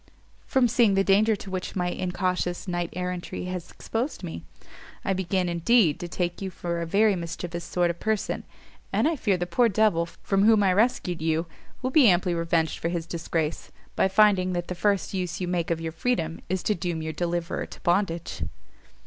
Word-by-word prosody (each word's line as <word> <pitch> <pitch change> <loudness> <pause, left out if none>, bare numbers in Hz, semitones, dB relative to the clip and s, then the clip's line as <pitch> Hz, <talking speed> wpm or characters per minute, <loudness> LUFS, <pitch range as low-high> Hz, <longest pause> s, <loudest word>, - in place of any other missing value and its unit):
"From 260 -2 +3
seeing 230 -4 +3
the 195 - +3
danger 210 +3 +4
to 195 -1 -9
which 185 -1 -4
my 180 -2 0
incautious 180 0 -2
knight 175 -1 -1
errantry 180 0 -4
has 180 -2 -5
exposed 235 0 -4
me; 160 - -6 0.6
I 195 - +2
begin, 185 0 0
indeed, 170 0 +3
to 175 - -4
take 175 +1 -3
you 195 - -2
for 170 -1 -3
a 170 - -3
very 205 +3 +4
mischievous 170 0 -5
sort 175 -1 +1
of 170 - -11
person, 220 -2 -1 0.5
and - - +2
I 330 - +1
fear 205 -9 +1
the 175 - -2
poor 230 +7 +3
devil 195 -5 +2
from 195 +3 -1
whom 220 -2 +6
I 190 -2 +4
rescued 185 -5 +1
you 160 +1 +1 0.4
will 255 - 0
be 265 -5 +7
amply 180 0 +2
revenged 165 -1 0
for 165 - -1
his 170 -2 -2
disgrace, 165 -2 -3 0.2
by - - +3
finding 190 -2 +4
that 175 0 -3
the - - -1
first 200 +2 0
use 180 -3 -2
you 180 - -2
make 175 -2 -1
of 165 -1 0
your 165 0 -4
freedom 165 -3 -1
is 185 0 -1
to 210 - +2
doom 175 -3 -3
your 160 0 -3
deliverer 170 +1 -2
to - - -12
bondage." 175 -2 0
180 Hz, 195 wpm, -26 LUFS, 170-200 Hz, 0.6 s, be